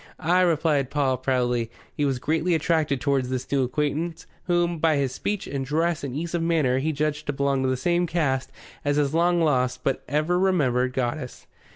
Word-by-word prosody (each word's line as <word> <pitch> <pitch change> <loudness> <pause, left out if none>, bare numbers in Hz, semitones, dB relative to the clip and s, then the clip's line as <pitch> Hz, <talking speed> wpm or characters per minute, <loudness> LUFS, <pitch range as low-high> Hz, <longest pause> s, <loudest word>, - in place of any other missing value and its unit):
"Ay," 180 +2 +3
replied 155 -6 +2
Paul 135 -3 +1
proudly. 125 -3 0 0.2
He 145 - 0
was 135 -2 0
greatly 160 +6 0
attracted 160 -4 +1
towards 135 -2 0
this 130 0 -2
new 140 -2 +2
acquaintance, 150 +6 -2 0.2
whom, 175 -1 +1
by 160 -1 +3
his 140 -3 0
speech 205 +7 -3
and 140 -1 -3
dress 160 +4 0
and 135 -2 -4
ease 170 +3 -4
of 170 - 0
manner, 155 -6 +2
he 155 +4 0
judged 150 0 -2
to 145 - 0
belong 140 -1 0
to 130 - +1
the 130 - 0
same 175 +6 +1
caste 145 -6 -1 0.3
as 145 0 +1
his 145 -1 +1
lost 155 -7 +2
but 135 - 0
ever 155 +5 +1
remembered 130 -10 +2
goddess. 130 +1 -3
145 Hz, 190 wpm, -25 LUFS, 130-165 Hz, 0.3 s, Ay